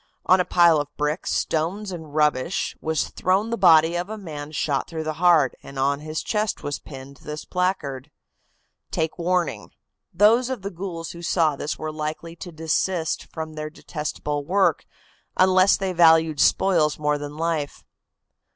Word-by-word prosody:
On 185 - +5
a 180 - +2
pile 170 -2 +5
of 145 - -6
bricks, 150 +3 -1
stones 185 +6 -1
and 160 -4 -8
rubbish 150 +2 +1
was 160 -1 -1
thrown 195 +5 0
the - - +1
body 165 -4 +5
of 175 +3 -3
a 220 - -5
man 155 -6 -7
shot 145 -2 -1
through 160 -1 -4
the 155 0 -3
heart, 165 -7 +5
and 140 - -11
on 140 +1 +1
his 155 +1 -5
chest 215 0 -1
was 145 0 -3
pinned 135 -1 -11
this 150 +3 -7
placard: 150 -7 -2 0.8
"Take 160 +2 -2
warning!" 180 +1 -1 0.4
Those 220 +7 +4
of 255 -7 -4
the 200 - -4
ghouls 170 -2 -6
who 170 - -10
saw 160 -3 +1
this 145 +3 -4
were 155 0 -5
likely 155 +2 -5
to 175 - -8
desist 160 +1 -1
from 160 -1 -6
their 155 0 -5
detestable 150 -2 -4
work, 190 +6 +1 0.5
unless 185 +1 +5
they 190 -1 -2
valued 160 -3 +5
spoils 165 -4 +3
more 150 -1 0
than 145 +1 -7
life. 160 -3 -2
160 Hz, 165 wpm, -23 LUFS, 150-180 Hz, 0.8 s, On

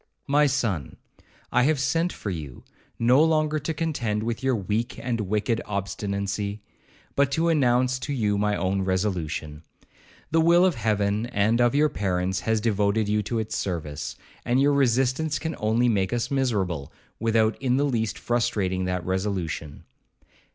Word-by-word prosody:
'My 145 +1 +4
son, 115 - -1 0.5
I 125 - +3
have 145 +2 +2
sent 165 +6 +1
for 105 - -5
you, 75 -7 -7 0.3
no 125 +6 +5
longer 155 -1 +2
to 150 +3 -3
contend 135 -10 -2
with 115 0 -3
your 130 -1 +1
weak 110 +4 -2
and 120 -3 -2
wicked 105 +3 0
obstinacy, 100 +1 -3 0.5
but 140 -1 +2
to 165 +2 +2
announce 130 -4 +2
to 145 - -5
you 105 -7 +1
my 105 0 +1
own 95 +2 0
resolution. 90 -6 -2 0.7
The 165 +1 +4
will 170 +2 +5
of 185 - +3
Heaven 105 -2 0
and 110 +1 +2
of 120 +2 +3
your 150 +1 +4
parents 95 -4 -1
has 110 -1 0
devoted 105 -1 +1
you 105 +1 +1
to 110 +3 -3
its 110 -1 -2
service, 75 -5 -4 0.3
and 125 +2 +1
your 145 +1 +4
resistance 135 +3 +2
can 160 +2 -4
only 110 +3 +2
make 100 -4 +1
us 120 +2 -1
miserable, 100 - -1 0.3
without 115 0 +2
in 130 -1 +2
the 145 - +2
least 115 -7 -1
frustrating 95 -6 0
that 90 -1 -2
resolution.' 95 -6 -3
110 Hz, 160 wpm, -25 LUFS, 100-130 Hz, 0.7 s, no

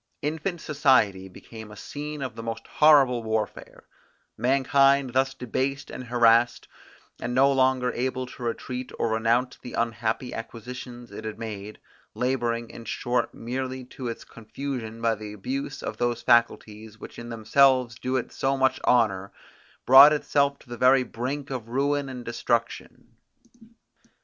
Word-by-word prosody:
Infant 160 +4 -2
society 120 -11 +2
became 110 +3 -11
a 105 - -11
scene 150 +5 -6
of 130 -4 -4
the 115 - -7
most 115 0 -5
horrible 140 -6 +5
warfare: 110 -1 -4 0.5
Mankind 135 0 +3
thus 135 +1 +1
debased 135 +3 -3
and 130 - -7
harassed, 120 0 +3 0.5
and 125 - -3
no 135 +2 +5
longer 130 -2 +2
able 130 +1 -2
to 125 - -13
retreat, 125 +1 -4
or 115 - 0
renounce 115 +3 +1
the 125 - -9
unhappy 115 +1 -2
acquisitions 120 +1 -8
it 100 - -8
had 110 -1 -6
made; 105 -2 -7 0.4
labouring, 120 -2 -1
in 115 - -10
short 120 +2 -2
merely 130 +2 -4
to 125 0 -7
its 115 - -5
confusion 115 -1 -7
by 115 -1 +3
the 105 -1 -8
abuse 135 +6 -5
of - - -5
those 120 -1 -1
faculties, 110 -2 +1
which - - -10
in 120 0 -8
themselves 125 +2 +3
do 130 +3 -3
it 125 - -4
so 135 0 -1
much 130 0 +2
honour, 100 -6 +2 0.5
brought 135 +4 +9
itself 140 -1 +1
to - - -21
the 120 0 -7
very 130 +2 +5
brink 135 +4 -5
of 120 -4 -5
ruin 140 +2 0
and 125 -2 -8
destruction. 115 0 -3
125 Hz, 150 wpm, -25 LUFS, 115-135 Hz, 0.5 s, brought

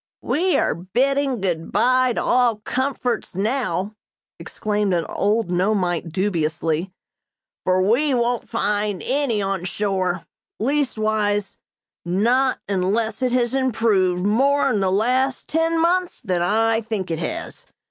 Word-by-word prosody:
"We 360 +4 +1
are - - +1
bidding 255 - 0
good 170 -4 -2
bye 255 0 +3
to - - -2
all 245 -2 +3
comforts 250 0 -2
now!" 215 -1 -1 0.5
exclaimed 210 -3 -1
an 170 -2 -1
old 205 -1 0
Nomeite 180 -2 0
dubiously, 165 -1 -1 0.7
"for 185 0 +2
we 255 +8 +2
won't 240 0 -1
find 205 -2 -1
any 255 -6 0
on 195 -2 -2
shore; 185 -1 -1 0.3
leastwise 215 -6 0 0.5
not 235 +9 +1
unless 205 +5 0
it 255 -1 +1
has 245 -1 +1
improved 215 -8 +1
more 275 +7 +3
in 210 - +1
the 190 -1 +1
last 250 +6 +1
ten 325 +1 +1
months 355 +2 +1
than 185 -7 -1
I 225 +5 +2
think 210 -5 -4
it 160 - -2
has. - - -5
215 Hz, 125 wpm, -22 LUFS, 185-255 Hz, 0.7 s, bye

